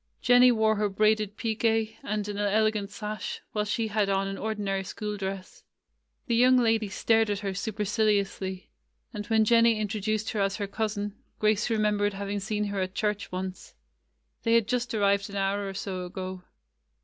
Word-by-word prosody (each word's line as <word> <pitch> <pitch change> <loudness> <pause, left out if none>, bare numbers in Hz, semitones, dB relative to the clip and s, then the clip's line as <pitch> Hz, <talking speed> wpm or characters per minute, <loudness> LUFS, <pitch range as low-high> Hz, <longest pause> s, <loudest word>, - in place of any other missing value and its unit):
Jen 245 0 +5
nie 250 0 +8
wore 220 -2 +2
her 210 0 +1
braided 215 +1 +1
pique 225 -1 0
and 210 0 -2
an 205 -1 -4
elegant 210 0 +1
sash, 210 -1 -5
while 210 -1 -1
she 220 +2 -1
had 205 -1 +1
on 195 0 +1
an 195 - -4
ordinary 200 -2 -2
school 210 +2 -5
dress. 195 -1 -6 0.6
The 235 - -1
young 255 +2 +6
lady 225 -3 +2
stared 225 +2 +2
at 205 0 -1
her 200 -1 -2
supercil 210 +2 -1
iously; 190 -1 -5 0.5
and 210 -1 -5
when 220 -1 +3
Jennie 230 0 +4
introduced 215 0 -1
her 210 - -1
as 195 0 +1
her 205 - -2
cousin, 205 0 -3 0.2
Grace 215 0 +2
remembered 210 -2 +1
having 200 +1 -3
seen 210 +1 -2
her 200 -2 -2
at 185 0 -3
church 210 -1 -1
once. 185 0 -6 0.7
They 230 0 +3
had 230 -3 +3
just 250 0 -1
arrived 200 -1 +2
an 200 - -8
hour 195 0 0
or 195 - -7
so 185 -2 -4
ago. 185 0 -6
210 Hz, 180 wpm, -27 LUFS, 195-220 Hz, 0.7 s, nie